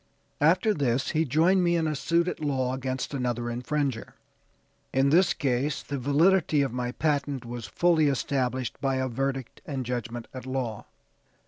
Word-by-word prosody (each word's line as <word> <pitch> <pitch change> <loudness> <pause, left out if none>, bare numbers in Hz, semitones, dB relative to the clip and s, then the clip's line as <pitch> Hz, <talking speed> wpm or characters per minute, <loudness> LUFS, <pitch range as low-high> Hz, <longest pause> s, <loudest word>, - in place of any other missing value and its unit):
After 180 +8 +4
this 130 - 0
he 160 +1 +1
joined 165 +7 +3
me 175 0 +3
in 165 -1 +1
a 155 - -1
suit 170 +4 +1
at - - -3
law 130 -4 0
against 130 +1 -3
another 120 -2 -2
infringer. 125 0 -2 0.8
In 135 +1 +2
this 180 +4 +5
case 140 +1 -1
the 140 -1 -4
validity 150 +3 +3
of 135 -4 -3
my 125 -1 -2
patent 140 -3 -1
was 120 -2 -6
fully 160 - +3
established 130 -2 -1
by 135 -1 +1
a 130 0 0
verdict 135 0 -3
and 135 -4 -4
judgment 120 -1 -4
at 130 0 -8
law. 130 -5 -3
135 Hz, 160 wpm, -27 LUFS, 125-150 Hz, 0.8 s, this